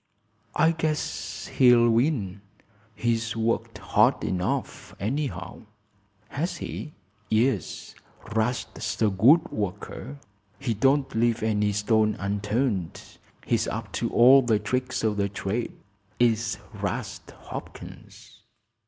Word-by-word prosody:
"I 160 +1 +4
guess 155 -2 -3
he'll 120 -2 +5
win. 115 - +1 0.5
He's 115 -1 -1
worked 115 +1 -1
hard - - +2
enough, 90 -1 -3
anyhow." 110 - -4 0.6
"Has 165 +6 -3
he?" 150 - -6 0.4
"Yes; 110 - 0 0.4
'Rast's 115 +2 -2
a 105 - +3
good 140 - +5
worker. 105 +7 -5 0.4
He 135 -4 -2
don't 135 +5 +2
leave 115 0 +1
any 105 -1 +1
stone 105 +1 +2
unturned. 100 -1 -1 0.5
He's - - +1
up - - -4
to - - -2
all 130 +3 +7
the 115 -4 +2
tricks 125 +5 -2
o' 110 -1 +2
the 100 -1 -1
trade, 100 +4 -3 0.4
is 115 -1 +2 0.2
'Rast - - -4
Hopkins!" - - -10
115 Hz, 110 wpm, -26 LUFS, 105-130 Hz, 0.6 s, all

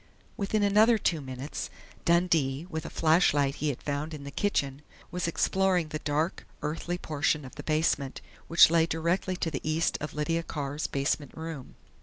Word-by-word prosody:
_ - - -29 0.3
Within 205 +1 0
another 215 +3 +5
two 165 -6 0
minutes, 130 +2 -5 0.4
Dundee, 165 -4 +2
with 160 0 -4
a - - -6
flashlight 150 -4 +3
he 150 - 0
had 135 - -4
found 150 +2 -3
in 145 - -9
the 140 - -7
kitchen, 140 -6 -1 0.3
was 180 -1 -1
exploring 180 -1 +1
the 155 - -4
dark, 150 +4 -1 0.2
earthy 165 +3 -2
portion 150 -2 0
of 130 - -10
the - - -7
basement 155 -3 0 0.3
which 165 -1 +7
lay 165 -1 +4
directly 170 +3 0
to 165 -2 -2
the 135 - -3
east 155 +1 0
of 150 0 -5
Lydia 165 +2 0
Carr's 145 -2 -3
basement 140 +1 -1
room. 160 -5 -7
155 Hz, 175 wpm, -29 LUFS, 145-170 Hz, 0.4 s, which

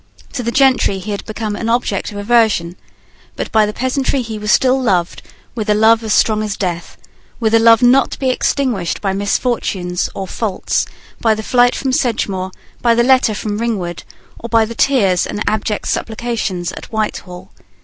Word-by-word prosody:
To 260 - -3
the 235 - -2
gentry 260 -6 +3
he 195 +3 -6
had 200 - -4
become 215 -1 -4
an 225 +2 -3
object 235 -1 -1
of 205 - -8
aversion: 205 -5 +2 0.6
but - - -5
by 215 -1 +4
the - - -2
peasantry 260 +2 -1
he 220 -2 -6
was 210 0 -1
still 265 0 +3
loved 180 -8 0 0.3
with 220 -3 -4
a 210 - +4
love 220 +1 +3
strong 215 0 +3
as 215 -1 -3
death, 175 -3 -4 0.4
with 225 -2 0
a 225 - +6
love 230 +1 +5
not 255 +2 +5
to - - -7
be 260 -2 +1
extinguished 250 -9 -1
by 195 -2 -1
misfortunes 195 -3 -1
or 195 - -4
faults, 205 0 -2 0.3
by 220 -2 +2
the 220 - -6
flight 245 +1 +3
from 270 - -2
Sedgemoor, 200 -7 -1 0.3
by 235 -1 +3
the 235 - +3
letter 255 -3 +3
from 210 0 -3
Ringwood, 195 -8 -3 0.4
or 235 - -7
by 225 -1 +3
the 230 - -7
tears 205 -8 +2
and 210 - -3
abject 215 0 -1
supplications 220 -6 -2
at - - -9
Whitehall. 190 -4 -4
220 Hz, 180 wpm, -17 LUFS, 200-240 Hz, 0.6 s, a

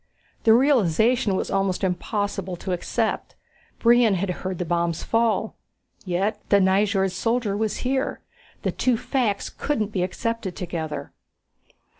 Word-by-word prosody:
The 220 - +7
realization 235 - +3
was - - -2
almost 195 -1 0
impossible 190 0 -2
to 185 +2 -5
accept. 220 +5 -2 0.4
Brion 235 -3 +5
had 185 +1 -1
heard 185 0 -4
the 180 - -2
bombs 170 0 -1
fall. 230 -1 +1 0.5
Yet 195 +4 -1
the 200 - +5
Nyjord 195 0 +2
soldier 225 +2 0
was 215 0 -1
here. 265 +1 0 0.4
The - - +1
two 250 -3 +1
facts 225 -6 -1
couldn't 220 -8 -2
be 190 - -1
accepted 200 +1 -2
together. 165 -4 -4
200 Hz, 130 wpm, -24 LUFS, 185-230 Hz, 0.5 s, The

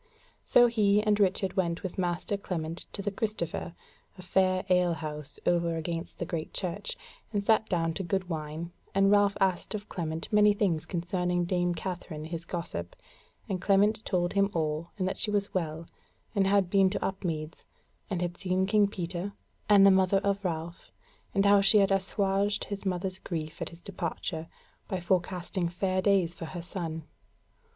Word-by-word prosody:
So 245 - +6
he 210 -3 +3
and 210 -1 +2
Richard 190 -1 +2
went 170 -3 0
with 190 0 -4
master 175 +2 -1
Clement 170 -4 -4
to 200 - -5
the 205 - -1
Christopher, 195 -5 -3 0.4
a 185 - -10
fair 185 0 +2
ale 180 -2 +3
house 150 -2 -6
over 170 -1 +2
against 165 +1 -4
the 170 - -3
Great 160 -1 -4
Church, 190 +2 -3 0.3
and 205 -2 0
sat 220 0 +3
down 165 -3 +1
to 190 - -3
good 185 +1 -1
wine; 160 0 -4 0.2
and 195 0 +5
Ralph 205 0 +4
asked 190 +1 +1
of 210 0 -6
Clement 160 -2 -3
many 210 0 +6
things 170 -7 0
concerning 175 0 -1
dame 175 -1 +1
Katherine 170 -4 -5
his 165 +1 -5
gossip, 90 - -5 0.5
and 185 -2 -2
Clement 210 +2 +3
told 175 -2 0
him 200 0 +3
all, 155 +1 -1
and 185 -2 0
that - - -3
she 215 - 0
was 205 -1 0
well, 165 -2 -2 0.5
and 195 -3 +2
had 200 -1 +3
been 195 -1 +5
to 190 - -2
Upmeads, 165 -5 -3 0.5
and 180 -3 -1
had 175 0 -4
seen 185 0 +1
King 205 +1 +4
Peter 185 0 -4 0.4
and 200 -1 +8
the 195 - +8
mother 190 0 +4
of 200 0 0
Ralph; 170 -1 -4 0.4
and 195 0 +3
how 200 0 +6
she 200 +2 +5
had 195 -1 +4
assuaged 195 +1 +1
his 200 -1 -4
mother's 185 0 -2
grief 155 -4 -5
at - - -2
his 170 +1 -12
departure 170 -3 -4 0.4
by 190 - -2
forecasting 180 0 -1
fair 185 +2 0
days 190 -4 +3
for 165 - -7
her 170 +1 -6
son. 165 -3 -4
185 Hz, 175 wpm, -29 LUFS, 170-200 Hz, 0.5 s, and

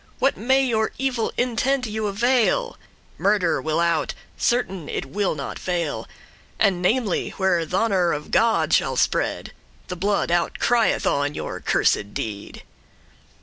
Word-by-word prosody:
What 270 - +2
may 265 +4 +2
your 220 -3 0
evil 255 -3 -1
intente 250 +2 +1
you 215 -1 -2
avail? 245 - +1 0.4
Murder 200 -4 +2
will 155 +1 -1
out, 170 -3 +1 0.2
certain 195 -10 -1
it - - -3
will 190 +6 -1
not 140 -2 -6
fail, 170 -4 -3 0.5
And 195 -4 +2
namely* 210 +1 +1
where 190 -3 +2
th' - - -12
honour 190 -5 +2
of 150 0 -4
God 230 0 +2
shall - - +2
spread; - - 0
*especially - - -32
The 180 - -3
blood 200 0 0
out 175 -1 +1
crieth 240 -2 +2
on 145 +1 0
your - - -5
cursed 100 0 +1
deed. 100 -2 -6
200 Hz, 145 wpm, -23 LUFS, 170-240 Hz, 0.5 s, What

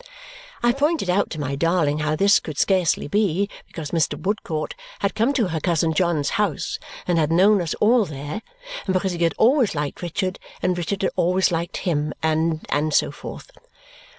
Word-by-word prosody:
I 240 - +5
pointed 285 - +1
out 200 +3 +1
to 155 - -6
my 140 -1 -2
darling 160 -1 +1
how 150 0 0
this 200 +5 +5
could 155 -3 -8
scarcely 185 -7 +2
be, 200 +2 +1 0.2
because 155 -3 -7
Mr. 165 -4 0
Woodcourt 180 -6 -2 0.2
had 200 - -1
come 230 +5 +2
to 230 -9 +1
her 160 -1 -2
cousin 165 -1 +1
John's 165 -3 +1
house 185 -9 -1 0.3
and 175 -2 +2
had 155 0 +1
known 195 +4 +5
us 165 -3 -2
all 225 +1 +4
there, 150 +6 -6 0.5
and 190 - +1
because 185 0 +1
he 175 -1 -5
had 165 - +1
always 245 - +3
liked 145 -1 -3
Richard, 185 +2 -2 0.2
and 180 0 0
Richard 185 +3 -3
had - - +1
always 185 +2 +2
liked 170 0 -2
him, 150 -4 -1
and 160 0 0
and 150 +1 0
so - - +3
forth. - - -9
175 Hz, 185 wpm, -23 LUFS, 155-200 Hz, 0.5 s, I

